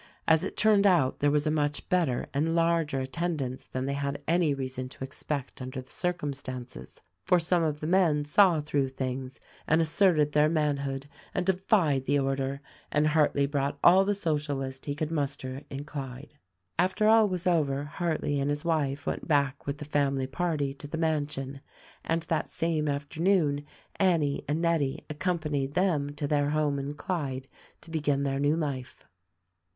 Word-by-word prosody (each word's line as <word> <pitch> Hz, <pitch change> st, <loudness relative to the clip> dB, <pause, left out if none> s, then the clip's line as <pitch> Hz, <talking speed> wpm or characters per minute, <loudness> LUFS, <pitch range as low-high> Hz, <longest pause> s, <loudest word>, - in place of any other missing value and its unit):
As 160 Hz, -1 st, +4 dB
it -, -, -5 dB
turned 210 Hz, -2 st, +5 dB
out 165 Hz, -9 st, +3 dB
there 145 Hz, -, +3 dB
was 145 Hz, +1 st, +2 dB
a 155 Hz, -, +2 dB
much 150 Hz, -1 st, -1 dB
better 165 Hz, -9 st, +1 dB
and 160 Hz, +4 st, +1 dB
larger 165 Hz, -4 st, +1 dB
attendance 135 Hz, -2 st, -3 dB
than 130 Hz, 0 st, -3 dB
they 140 Hz, -, -1 dB
had 140 Hz, 0 st, -2 dB
any 165 Hz, -1 st, +3 dB
reason 130 Hz, -2 st, -3 dB
to 135 Hz, -, -9 dB
expect 140 Hz, 0 st, -5 dB
under 130 Hz, +1 st, -5 dB
the 130 Hz, -, -11 dB
circumstances, 135 Hz, -, -4 dB, 0.2 s
for 180 Hz, -, +4 dB
some 175 Hz, +1 st, +2 dB
of 155 Hz, -2 st, -1 dB
the -, -, -3 dB
men 165 Hz, -4 st, +3 dB
saw 170 Hz, +1 st, +4 dB
through 145 Hz, -2 st, 0 dB
things 130 Hz, 0 st, -4 dB, 0.3 s
and 160 Hz, -, +4 dB
asserted 160 Hz, -2 st, +3 dB
their 150 Hz, +1 st, +4 dB
manhood 140 Hz, -3 st, -1 dB, 0.3 s
and 180 Hz, -, 0 dB
defied 180 Hz, -7 st, +2 dB
the 145 Hz, +2 st, +2 dB
order, 135 Hz, 0 st, -1 dB, 0.3 s
and 150 Hz, 0 st, +2 dB
Hartleigh 150 Hz, -2 st, +3 dB
brought 140 Hz, 0 st, -1 dB
all 185 Hz, +2 st, +7 dB
the 205 Hz, +1 st, +1 dB
Socialists 145 Hz, -7 st, -2 dB
he 145 Hz, -, -1 dB
could 155 Hz, +1 st, -3 dB
mus 145 Hz, -3 st, 0 dB
ter 130 Hz, 0 st, -7 dB
in 135 Hz, +1 st, -5 dB
Clyde. 140 Hz, -1 st, -7 dB, 0.5 s
After 185 Hz, +4 st, +2 dB
all 220 Hz, -1 st, +6 dB
was 180 Hz, 0 st, -2 dB
over 145 Hz, -6 st, +2 dB
Hartleigh 150 Hz, -2 st, -1 dB
and 140 Hz, -, 0 dB
his 145 Hz, +2 st, -2 dB
wife 145 Hz, -4 st, 0 dB
went -, -, -3 dB
back 140 Hz, -3 st, +1 dB
with 140 Hz, +1 st, -2 dB
the 150 Hz, -, -7 dB
family 140 Hz, -2 st, +1 dB
party 145 Hz, -1 st, -1 dB
to 145 Hz, +1 st, -9 dB
the 160 Hz, -, -4 dB
mansion, 145 Hz, -4 st, -2 dB, 0.4 s
and 165 Hz, 0 st, 0 dB
that 160 Hz, -, -1 dB
same 160 Hz, -2 st, -1 dB
afternoon 150 Hz, +1 st, +1 dB, 0.3 s
Annie 165 Hz, -7 st, +2 dB
and 155 Hz, +4 st, -1 dB
Nettie 160 Hz, -5 st, 0 dB
accompanied 150 Hz, -4 st, -1 dB
them 150 Hz, -6 st, +1 dB
to 145 Hz, -, -3 dB
their 145 Hz, 0 st, +1 dB
home 150 Hz, -2 st, +1 dB
in 140 Hz, +2 st, -4 dB
Clyde 140 Hz, -5 st, -3 dB, 0.3 s
to 165 Hz, -, -13 dB
begin 145 Hz, -3 st, 0 dB
their 135 Hz, -1 st, -1 dB
new 145 Hz, +2 st, +2 dB
life. 140 Hz, -6 st, -4 dB
145 Hz, 175 wpm, -28 LUFS, 140-165 Hz, 0.5 s, all